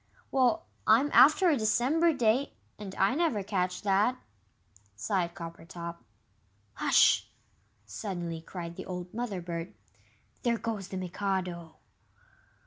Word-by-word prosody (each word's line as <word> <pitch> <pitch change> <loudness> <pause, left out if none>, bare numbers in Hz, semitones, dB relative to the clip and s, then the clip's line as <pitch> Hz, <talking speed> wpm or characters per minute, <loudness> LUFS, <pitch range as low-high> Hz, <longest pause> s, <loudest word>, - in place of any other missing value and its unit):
"Well, 250 -4 +2 0.2
I'm 235 +7 +5
after 305 - +7
a 300 - +3
December 255 +10 +2
day, 255 0 +1 0.3
and 195 -2 -7
I 195 +4 +2
never 290 - 0
catch 185 -2 -2
that," 205 +5 +2 0.8
sighed 170 - -1
Coppertop. 170 0 -8 0.8
"Hush!" - - +4 0.6
suddenly 170 - -5
cried 170 0 -7
the - - -6
old 180 -1 -6
Mother 215 -6 -3
bird. 170 0 -5 0.7
"There 235 -2 +1
goes 220 -5 -4
the 190 - -6
Mikado!" 180 -3 -3
195 Hz, 115 wpm, -29 LUFS, 175-240 Hz, 0.8 s, after